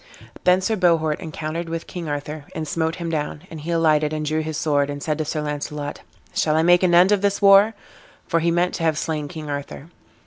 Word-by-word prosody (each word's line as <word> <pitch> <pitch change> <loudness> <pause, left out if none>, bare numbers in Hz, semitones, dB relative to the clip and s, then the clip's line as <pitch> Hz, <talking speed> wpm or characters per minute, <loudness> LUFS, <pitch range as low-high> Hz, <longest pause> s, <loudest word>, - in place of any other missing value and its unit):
Then 180 +1 +5
Sir 220 +4 0
Bohort 165 -5 +2
encountered 160 +1 -5
with 165 0 -4
King 170 -3 -6
Arthur, 145 +1 -5
and 155 -1 -4
smote 160 +1 -1
him 170 -2 -4
down; 150 0 -3
and 160 -2 -7
he 160 - -7
alighted 155 -2 +2
and 155 0 -2
drew 155 +1 0
his 155 -1 -4
sword, 145 -3 +1
and 145 0 -5
said 155 -1 -1
to 155 - -1
Sir 155 +1 -2
Launcelot, 145 0 -4 0.3
"Shall 155 -1 +1
I 160 - +3
make 175 +1 +5
an 180 -2 +3
end 180 +3 +6
of 205 -2 +3
this 200 0 +1
war?" 200 +2 +6 0.5
for 165 - +1
he 170 +1 +1
meant 175 +2 +1
to 165 - -4
have 160 -2 +2
slain 155 -2 -2
King 155 -1 -8
Arthur. 145 +1 -6
160 Hz, 230 wpm, -22 LUFS, 150-175 Hz, 0.5 s, end